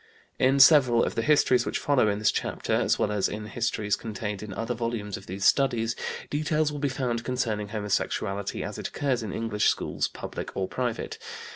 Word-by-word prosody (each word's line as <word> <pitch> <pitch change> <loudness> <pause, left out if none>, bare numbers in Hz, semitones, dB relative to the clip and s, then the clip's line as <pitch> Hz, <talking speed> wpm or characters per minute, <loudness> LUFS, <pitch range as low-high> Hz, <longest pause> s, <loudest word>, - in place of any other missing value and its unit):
In 135 +2 +3
several 130 -5 +7
of - - -1
the 115 - -1
Histories 130 -3 +4
which - - -2
follow 140 -6 +2
in 100 -1 +1
this 105 - +3
chapter, - - -2
as - - +2
well 105 - 0
as 105 -2 +1
in 105 0 -5
Histories 110 -1 -1
contained 105 -2 -5
in 105 -1 -7
other 115 +4 -3
volumes 115 -4 -3
of 95 - -10
these 95 +2 -3
Studies, 120 -4 +3 0.4
details 150 +1 +1
will 145 - -5
be 145 0 0
found 125 -3 -2
concerning 115 -5 -1
homosexuality 100 -1 -2
as - - -5
it - - -3
occurs 130 -4 -1
in 110 -3 -5
English 115 -1 0
schools, - - 0
public - - -7
or 95 -1 0
private. 120 0 -3
115 Hz, 190 wpm, -27 LUFS, 105-130 Hz, 0.4 s, several